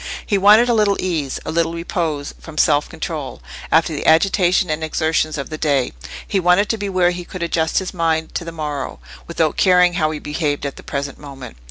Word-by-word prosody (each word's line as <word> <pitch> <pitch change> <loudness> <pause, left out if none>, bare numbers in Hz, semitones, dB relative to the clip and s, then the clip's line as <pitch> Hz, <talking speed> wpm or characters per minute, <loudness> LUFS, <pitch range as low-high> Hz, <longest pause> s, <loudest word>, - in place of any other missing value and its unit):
He 205 - 0
wanted 210 +4 +6
a 240 - +3
little 210 -3 +2
ease, 155 -7 -2
a - - -3
little 165 0 0
repose 165 -4 -3
from 160 -2 -12
self 150 -1 +3
control, 160 -4 -5 0.3
after 160 0 +3
the 145 - -3
agitation 180 +1 +3
and 155 +1 -2
exertions 155 0 0
of 140 +1 -5
the 155 - -5
day; 140 -5 +1 0.3
he 195 - 0
wanted 180 +3 +3
to 225 - 0
be 200 -1 -3
where 180 -2 +2
he 175 0 -5
could 180 0 -7
adjust 160 -1 0
his 190 - -1
mind 160 -2 -1
to - - -3
the 165 - -6
morrow, 150 -4 -4 0.3
without 160 -2 0
caring 180 -2 +4
how 160 -3 +1
he 155 - -4
behaved 150 -1 -2
at 140 - -4
the - - -11
present 140 0 -5
moment. 135 - -10
160 Hz, 210 wpm, -19 LUFS, 150-180 Hz, 0.3 s, wanted